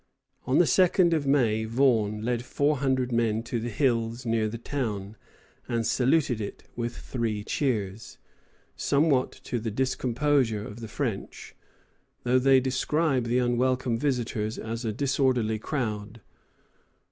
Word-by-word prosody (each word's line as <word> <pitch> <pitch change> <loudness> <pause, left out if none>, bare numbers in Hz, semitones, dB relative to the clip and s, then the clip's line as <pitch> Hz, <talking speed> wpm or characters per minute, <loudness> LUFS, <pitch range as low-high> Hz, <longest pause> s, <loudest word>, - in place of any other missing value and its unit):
On 130 - +3
the 175 - +6
2d 180 0 +4
of 150 -4 0
May 115 -6 +2
Vaughan 110 -3 +2
led 120 -1 -1
four 145 +4 +1
hundred 130 -2 0
men 115 -1 +1
to 120 0 -3
the 120 +2 -3
hills 120 -2 0
near 115 -1 +1
the 110 +2 -5
town, 110 -6 -4 0.5
and 115 -1 -1
saluted 130 -2 +2
it 100 - -6
with 120 0 -4
three 110 -4 -3
cheers, 115 -3 -2 0.6
somewhat 140 -3 +2
to 120 - -2
the 115 +1 -3
discomposure 130 -1 0
of 105 - -9
the 115 - -7
French, 110 -3 -5 0.7
though 125 +1 +3
they 135 +1 +5
describe 130 +1 0
the 120 +1 +1
unwelcome 125 0 +1
visitors 120 -5 -1
as 115 +2 -5
a 110 - -1
disorderly 125 -3 +1
crowd. 110 -4 -4
120 Hz, 135 wpm, -27 LUFS, 110-135 Hz, 0.7 s, the